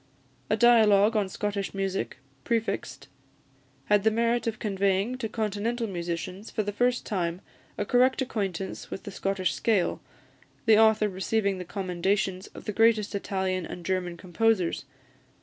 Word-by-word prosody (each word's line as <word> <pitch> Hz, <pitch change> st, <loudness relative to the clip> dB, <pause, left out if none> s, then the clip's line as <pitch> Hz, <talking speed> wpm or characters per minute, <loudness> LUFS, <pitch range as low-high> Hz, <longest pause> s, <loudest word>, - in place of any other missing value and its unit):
"A 215 Hz, -, +2 dB
Dialogue 220 Hz, -2 st, +5 dB
on 205 Hz, -3 st, +1 dB
Scottish 200 Hz, 0 st, -3 dB
Music," 195 Hz, -5 st, -2 dB, 0.3 s
prefixed, 230 Hz, -1 st, -2 dB, 0.8 s
had 205 Hz, -1 st, +3 dB
the 220 Hz, -, +5 dB
merit 235 Hz, +2 st, +1 dB
of 220 Hz, -1 st, -1 dB
conveying 200 Hz, +2 st, 0 dB
to 225 Hz, -4 st, -3 dB
Continental 220 Hz, +2 st, -2 dB
musicians 180 Hz, +1 st, -4 dB
for 215 Hz, -, -1 dB
the 205 Hz, -, -2 dB
first 245 Hz, +4 st, +1 dB
time 175 Hz, -3 st, -2 dB, 0.4 s
a 205 Hz, -, -1 dB
correct 250 Hz, +4 st, +3 dB
acquaintance 195 Hz, -8 st, -3 dB
with -, -, -6 dB
the 200 Hz, -, -7 dB
Scottish 195 Hz, -2 st, -1 dB
scale, 210 Hz, -6 st, +1 dB, 0.6 s
the 220 Hz, -2 st, +6 dB
author 220 Hz, -1 st, +5 dB
receiving 200 Hz, 0 st, -1 dB
the 180 Hz, -, -6 dB
commendations 190 Hz, +1 st, -1 dB
of -, -, -10 dB
the 210 Hz, -, -3 dB
greatest 220 Hz, -1 st, +3 dB
Italian 190 Hz, -2 st, -1 dB
and 170 Hz, +1 st, -8 dB
German 180 Hz, -2 st, -1 dB
composers. 185 Hz, +1 st, 0 dB
205 Hz, 145 wpm, -27 LUFS, 190-220 Hz, 0.8 s, the